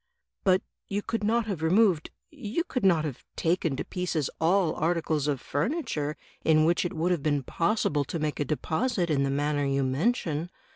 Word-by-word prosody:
"But 185 -1 +3 0.2
you 205 +1 -2
could 230 -2 -2
not 230 +2 +2
have 195 -7 -3
removed 180 -1 +3 0.2
— - - -31
^you 285 - -3
could 255 - -2
not 170 -5 +4
have 140 -5 -5
taken 165 -3 +1
to - - -4
pieces 175 -6 -2
all 175 0 +3
articles 160 -2 0
of 140 -3 0
furniture 150 - -2 0.3
in 155 -1 +4
which 170 +2 +2
it 175 - -3
would 170 +3 0
have 175 -4 +1
been 145 -2 +1
possible 165 - +1
to 165 - -4
make 155 -1 -2
a 145 - +1
deposit 175 - 0
in 140 -2 +2
the 140 - +1
manner 145 +1 0
you 140 0 +1
mention. 160 - 0
160 Hz, 190 wpm, -28 LUFS, 150-195 Hz, 0.3 s, not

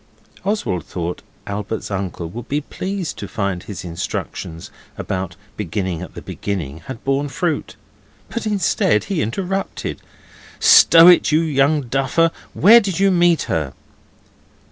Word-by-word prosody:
Oswald 155 - -1
thought 90 0 -5 0.2
Albert's 105 +2 -4
uncle 95 -3 -3
would 120 +8 -8
be 145 - +1
pleased 185 +4 -5
to - - -5
find 100 -5 -2
his 100 -3 -8
instructions 85 -1 -5 0.3
about 95 -2 -4 0.2
beginning 95 -3 -3
at - - -9
the - - -8
beginning 80 -7 -4
had 130 -3 -7
borne 135 +1 0
fruit, 160 +4 -2 0.5
but 235 -2 -4
instead 190 - +2
he 185 -6 -2
interrupted. 190 - -3 0.6
'Stow 165 0 +8
it, 180 -2 +6
you 155 +2 +4
young 150 -1 +2
duffer! 135 +6 +1 0.2
Where 225 +7 +8
did 195 -5 -3
you 195 0 +4
meet 175 -2 +3
her? 75 -5 -2
135 Hz, 135 wpm, -20 LUFS, -, 0.6 s, Stow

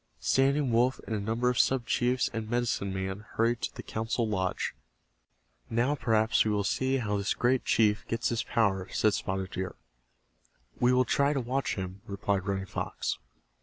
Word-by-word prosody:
Standing 135 0 +2
Wolf 120 +3 +3
and 110 - -2
a - - -1
number 115 +4 -1
of 125 -1 +2
sub 130 -3 +3
chiefs 125 +1 +1
and 110 -1 -4
medicine 120 -5 0
men 95 +1 -3 0.2
hurried 115 +1 +2
to - - -3
the - - -7
council 115 +1 -1
lodge. 95 -3 -1 1.0
"Now 120 +5 +2
perhaps 110 -5 +2
we 110 - 0
will 105 -1 +1
see 130 +6 +1
how 105 -5 -1
this 100 0 0
great 125 +1 +1
chief 105 -2 +2
gets 115 +1 0
his 115 -1 0
power," 95 -5 0
said 110 - +2
Spotted 95 0 -2
Deer. 95 0 -4 1.0
"We 125 0 +4
will 125 0 +4
try 140 +5 +2
to 140 - 0
watch 130 +1 -1
him," 95 0 -5
replied 100 -1 -1
Running 95 -1 -1
Fox. - - -3
115 Hz, 175 wpm, -29 LUFS, 100-125 Hz, 1.0 s, We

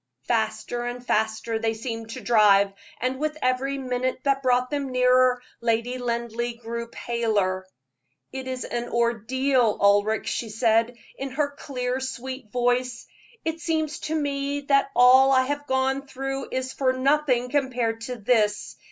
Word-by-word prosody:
Faster 220 - -1
and 245 0 -5
faster 220 0 0
they 225 0 0
seemed 225 -1 -5
to - - -7
drive; 200 -4 +4 0.3
and 255 +2 -1
with 305 0 -2
every 265 +1 0
minute 255 -1 -2
that 275 -1 +1
brought 250 0 +2
them 280 -2 -2
nearer, 255 0 +4 0.2
Lady 235 +2 0
Linleigh 235 0 -3
grew 235 0 -5
paler. 210 -6 -1 0.6
"It 265 -1 -6
is 255 -1 -4
an 240 0 -4
ordeal, 235 +1 +1
Ulric," 205 +2 +3
she 230 - -3
said, 230 +2 +2 0.2
in 275 - -3
her 285 +2 -1
clear, 255 -3 -3
sweet 260 -3 -6
voice; 245 0 0 0.4
"it 320 0 -2
seems 315 -3 -1
to 315 - 0
me 285 -1 -1
that 275 -1 +2
all 260 +2 +7
I 260 -1 +5
have 290 +2 -3
gone 265 +1 0
through 270 0 -4
is 260 0 -3
as 260 -1 0
nothing 260 -2 +2
compared 250 -5 0
to 250 - -4
this. 215 -2 0
250 Hz, 150 wpm, -25 LUFS, 230-270 Hz, 0.6 s, all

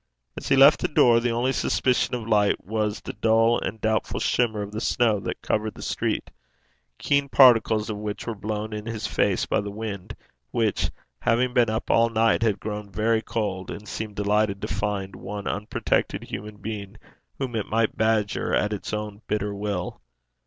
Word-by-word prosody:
As - - -6
he - - +5
left 140 +2 +7
the - - 0
door, 120 -5 +5
the 120 +1 0
only 120 +3 +1
suspicion 125 -1 +1
of 115 -2 -5
light 105 -2 +2
was 105 +1 -1
the - - -6
dull 115 +1 +3
and 110 - -4
doubtful 110 0 0
shimmer 110 -4 +1
of 100 - -7
the 110 +1 -4
snow 115 -4 +2
that - - -5
covered 110 0 -1
the - - -9
street, - - -2 0.7
keen 140 -1 +1
particles 115 -5 +5
of 110 -2 -4
which 105 0 -5
were 115 - -2
blown 110 +1 -4
in 105 +1 -5
his 115 -2 -4
face - - +1
by - - +1
the 100 - -5
wind, 105 -1 -6 0.3
which, 110 -3 0 0.3
having 125 +2 +1
been 120 -3 +4
up 110 +1 -2
all 115 0 +4
night, 115 0 +2
had 105 -4 +1
grown 105 0 -5
very 110 +2 +1
cold, 95 -5 -3
and 105 +1 -7
seemed 110 -2 -5
delighted 105 0 +1
to - - -1
find 100 -1 -3
one 100 0 -6
unprotected 105 +1 -1
human 105 +1 -7
being 100 -1 -6 0.4
whom 130 -3 -3
it 110 - -2
might 115 0 +1
badger 110 -2 +1
at 105 0 +1
its 105 - -5
own 105 0 -4
bitter 105 -1 -1
will. 100 -8 -4
110 Hz, 185 wpm, -25 LUFS, 105-115 Hz, 0.7 s, left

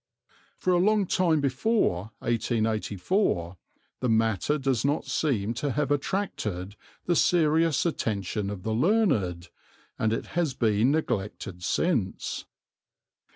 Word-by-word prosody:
For 185 - +1
a 175 - +4
long 210 +2 +3
time 170 -4 +2
before 135 - +1
1884 110 - 0 0.4
the 125 - -1
matter 110 - +2
does 135 -4 0
not 145 +2 0
seem 115 -8 0
to 125 +4 -2
have 145 0 0
attracted 110 - -2 0.3
the 175 - +2
serious 160 -2 +3
attention 105 - -2
of 100 -3 -6
the 110 - -1
learned, 110 - +1 0.5
and 110 - +1
it 115 - -2
has 165 -7 0
been 110 0 +2
neglected 105 - -2
since. 115 - -1
120 Hz, 115 wpm, -27 LUFS, 105-160 Hz, 0.5 s, a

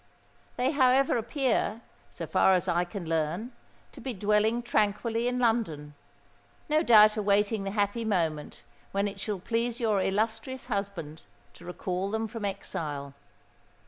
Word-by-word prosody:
They, 255 +2 +1
however, 270 -2 +3
appear, 235 -2 0 0.3
so - - -6
far 190 - +4
as 180 - -1
I 175 +1 +1
can 175 -1 -7
learn, 165 +8 -1 0.4
to - - -13
be 260 -3 -4
dwelling 210 +4 +1
tranquilly 225 +1 0
in 250 0 0
London—no 225 - -3
doubt 215 -6 +6
awaiting 205 0 +1
the - - -1
happy 205 +3 0
moment 165 -8 -2 0.3
when 200 +1 +1
it 200 0 -7
shall 210 0 -3
please 230 +5 -2
your 215 -5 +1
illustrious 225 +6 -1
husband 200 - -4 0.3
to 175 - -15
recall 180 +2 -3
them 220 +1 -2
from 220 -1 -6
exile. 150 -8 -4
210 Hz, 140 wpm, -28 LUFS, 185-235 Hz, 0.4 s, doubt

